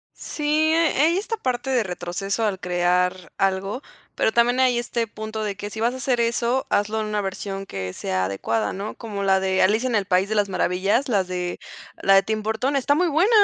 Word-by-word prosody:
Sí, 300 - -7 0.3
eh, 330 -1 +3
hay 330 +4 +4
esta 445 +3 -3
parte 255 - -2
de 255 -3 +2
retroceso 190 +3 -3
al 200 -3 -1
crear 180 0 0
algo, 195 +5 0 0.3
pero - - +2
también 240 +2 +3
hay 255 -2 +3
este 240 -1 -2
punto 220 0 -5
de 205 -2 -2
que 205 +1 -6
si 220 - -7
vas 235 +2 +1
a - - -6
hacer 255 -2 0
eso, 235 +2 +1
hazlo 210 +2 +1
en 215 - -1
una 210 -1 -1
versión 195 0 -4
que 95 - -5
sea 95 0 -1
adecuada, 105 +3 -1
¿no?, 200 +3 -5
como 210 -4 -5
la 190 -1 +3
de 190 0 +1
Alicia 220 +6 +3
en 245 - 0
el 205 -2 +1
País 185 0 +2
de 220 - -2
las 205 -1 +2
Maravillas, 195 +8 +1
las 200 -7 +1
de 180 -1 -3 0.5
la 195 - +6
de 195 - +6
Tim 215 -1 -2
Burton, 220 +6 -1
está 280 +1 +2
muy 355 +3 +2
buena 330 +6 +3
210 Hz, 220 wpm, -23 LUFS, 190-240 Hz, 0.5 s, la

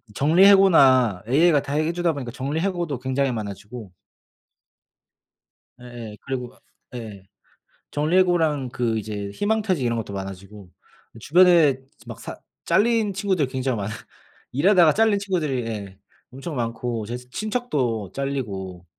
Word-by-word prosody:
정리 160 - +4
해고나 135 - +5
AI가 150 +3 +4
다 140 0 -6
해 155 +2 +1
주다 175 -1 0
보니까 130 -5 -6
정리 135 +5 -3
해고도 175 -7 -2
굉장히 130 +1 0
많아지고 105 -1 -7 1.9
예예. 120 -3 -9
그리고 130 -2 -4
아 - - -26 0.4
예. 105 -5 -9 0.7
정리해고랑 160 -3 +1
그 120 -2 -1
이제 105 -1 -5
희망퇴직 205 - 0
이런 115 -1 0
것도 110 -3 -5
많아지고 95 0 -8 0.5
주변에 165 -1 +5 0.3
막 - - -8
사 - - -8 0.3
잘린 220 -2 +2
친구들이 190 -7 0
굉장히 130 -1 -2
많아요. 105 +1 -4 0.6
일하다가 170 +2 +4
잘린 220 -1 +3
친구들이 155 - -2
예 100 -4 -6 0.3
엄청 135 +5 -7
많고 115 -1 -3
제 120 +2 -4
친척도 125 - -3
잘리고 100 -10 -4
135 Hz, 295 characters per minute, -23 LUFS, 115-175 Hz, 1.9 s, 해고나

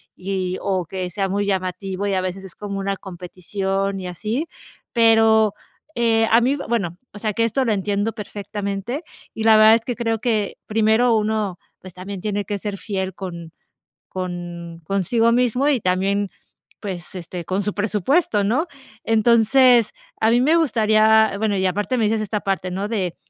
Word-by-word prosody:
y 185 -1 -3
o 185 -3 -1
que 185 +1 -4
sea 195 +2 -2
muy 200 +1 -1
llamativo, 190 +1 -2
y 200 - 0
a 185 - +1
veces 185 +1 -5
es 185 - -10
como 200 -1 -5
una 195 0 -1
competición 190 +2 -3
y 180 - -5
así. 220 - -3 0.5
Pero, 225 -2 +5 0.4
eh, 225 -1 +3
a 230 - +7
mí 260 +4 +2
bueno 195 -8 -1
o 205 - -10
sea, 215 -1 -1
que 230 - +1
esto 240 +4 +1
lo 220 - +2
entiendo 205 +2 -1
perfectamente. 205 - -5 0.3
Y 220 - -4
la 220 -1 +6
verdad 215 +1 +8
es 230 - 0
que 245 - -4
creo 225 -2 -1
que 220 -5 -1
primero 220 +2 +3
uno, 210 -4 -1 0.2
pues, 185 -2 -12
también 185 +1 -7
tiene 205 -2 -2
que 205 0 -3
ser 200 0 -5
fiel 190 -1 -3
con 170 -4 -7 0.6
con 175 -2 -6
consigo 210 +6 +1
mismo 250 +3 +2
y 265 -5 +2
también, 195 +2 0 0.5
pues, 185 -4 -6
este, 175 -1 -7
con 190 +2 -1
su 210 0 -2
presupuesto, 210 - +1
¿no? 250 - +1 0.4
Entonces 235 +1 +4 0.3
a 220 +1 +3
mí 240 +1 +4
me 310 +5 +4
gustaría, 220 -7 +4
bueno 210 -1 0
y 190 - 0
aparte 205 +6 -1
me 225 - +2
dices 215 0 +1
esta 210 0 -2
parte, 195 -2 -2
¿no?, 195 +3 -2
de 190 -6 -2
205 Hz, 175 wpm, -21 LUFS, 190-225 Hz, 0.6 s, verdad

